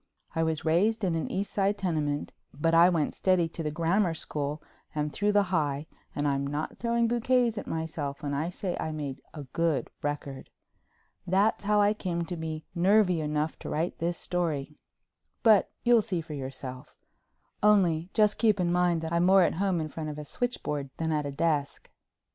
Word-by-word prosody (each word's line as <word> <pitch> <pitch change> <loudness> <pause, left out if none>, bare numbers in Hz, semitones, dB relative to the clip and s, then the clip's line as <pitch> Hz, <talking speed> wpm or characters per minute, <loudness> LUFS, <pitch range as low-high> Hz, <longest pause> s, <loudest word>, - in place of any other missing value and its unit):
I 165 - 0
was 160 -1 -1
raised 205 +8 +2
in 180 -3 +1
an 165 -1 -2
East 195 +2 -3
Side 200 +1 +1
tenement, 150 -6 -1 0.2
but 165 +3 +1
I 170 +2 +7
went 165 -5 0
steady 185 -3 +2
to 165 - -6
the 155 - -1
Grammar 170 +3 +1
school 150 -1 -2 0.4
and 150 0 -1
through 210 +1 +1
the 205 -2 +2
High 145 -3 0 0.3
and 145 0 0
I'm 140 0 0
not 145 +2 -4
throwing 235 0 +1
bouquets 240 0 +2
at - - -9
myself 155 -3 -4
when 145 -1 -2
I 155 +4 -1
say 180 0 -3
I 160 - -2
made 145 -3 -5
a 150 - -6
good 160 +2 -1
record. 145 -2 -4 0.8
That's 200 +3 +2
how 210 0 +4
I 205 +1 +4
come 175 -5 -2
to 175 - -5
be 160 -1 -5
nervy 185 -1 +3
enough 150 +1 -2
to - - -7
write 165 +3 -2
this 170 +1 -1
story—but 175 - -1
you'll 240 -2 +5
see 200 -5 -2
for 160 -1 -8
yourself. 130 0 -7 0.7
Only 185 -6 +3
just 210 -1 +3
keep 215 -4 +3
in 175 -1 +1
mind 175 -2 +2
that 160 +1 -4
I'm 170 +1 +3
more 190 0 +7
at - - +2
home 190 0 0
in 155 -1 -3
front 155 +1 -5
of 150 - -6
a 150 - -6
switchboard 150 - -3
than 160 0 -1
at 150 -2 0
a - - -4
desk. 150 -1 -1
165 Hz, 190 wpm, -28 LUFS, 150-195 Hz, 0.8 s, I